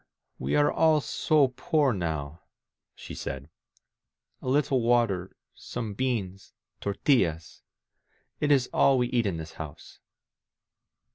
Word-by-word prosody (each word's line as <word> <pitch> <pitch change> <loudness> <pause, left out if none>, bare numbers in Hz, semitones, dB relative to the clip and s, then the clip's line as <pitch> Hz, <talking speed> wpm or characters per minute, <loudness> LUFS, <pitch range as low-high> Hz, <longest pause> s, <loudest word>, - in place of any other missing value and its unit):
"We 65 +2 -1
are 145 0 +4
all 160 -1 +4
so 145 -1 +2
poor 140 +1 +1
now," 80 -4 -4 0.5
she - - -9
said. 70 +3 -6 0.9
A - - -8
little 135 -2 +2
water, 115 -6 +1 0.2
some 115 -4 -6
beans 100 -5 -3
— - - -52
tortillas.... 100 - 0 0.8
It 145 - +1
is 135 -3 +4
all 135 -1 +4
we 125 -1 +1
eat 120 -4 +1
in 90 -4 -2
this 80 0 -7
house. 75 -3 -10
115 Hz, 125 wpm, -27 LUFS, 85-135 Hz, 0.9 s, are